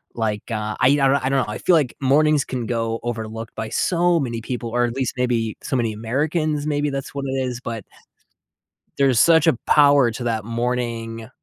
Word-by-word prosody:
like, 110 -3 -2
uh, 105 -1 -3
I 125 - +5
yeah, 140 0 +4
I 135 0 +1
I - - +1
don't 135 -1 +1
know. - - -6
I - - -4
feel 180 - +3
like 145 -7 +1
mornings 145 +2 +3
can 125 -2 -4
go 115 0 -2
overlooked 115 -1 -5
by 110 0 -4
so 175 +3 +2
many 120 -5 -3
people, 120 0 -4
or 120 0 +2
at 120 - -3
least 130 -2 -1
maybe 120 -3 -1
so - - -3
many 115 -3 0
Americans; 150 +7 -1
maybe 145 -1 0
that's 135 -1 -5
what 140 -1 -4
it 130 - -3
is, 125 -1 -4
but 115 -5 -6 1.2
there's 135 -5 +3
such 160 -2 +5
a - - +4
power 145 -4 +5
to 120 +1 -6
that 110 -3 -1
morning 115 -1 -3
125 Hz, 205 wpm, -21 LUFS, 115-140 Hz, 1.2 s, I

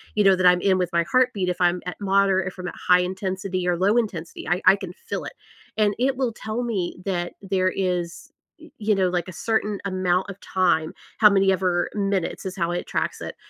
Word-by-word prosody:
you 210 - +3
know, 195 -1 +6
that 185 0 0
I'm 180 0 +5
in 190 -2 +3
with 180 -1 0
my 170 - +3
heartbeat 250 -8 +2
if 180 - -3
I'm 175 0 +2
at 180 - -5
moderate, 195 -1 +2
if 185 - -7
I'm 180 -1 -4 0.2
high 180 0 +6
intensity 190 0 -3
or 175 -1 +1
low 200 +6 +2
intensity, 185 -8 -3
I 175 +2 0
I - - +8
can 190 -3 -8
feel - - -6
it. - - -7 0.4
And 210 -1 +3
it 265 +2 +1
will 255 -4 -1
tell 220 +3 -4
me 200 -7 -2
that 175 -3 -2
there 190 -1 +1
is 180 -3 -3 0.3
y 320 +1 -14
you 210 -1 +1
know, 190 -1 +2
like, 175 -1 -2
a 185 - -8
certain 215 -2 +1
amount 185 -1 0
of 195 - -13
time, 175 -4 +1 0.3
how 215 - +8
many 195 -1 +3
ever 180 -2 0
minutes 195 -3 -1
is 190 - -4
how 170 -1 0
it 175 - -3
tracks - - -2
it - - -6
190 Hz, 220 wpm, -23 LUFS, 180-200 Hz, 0.4 s, I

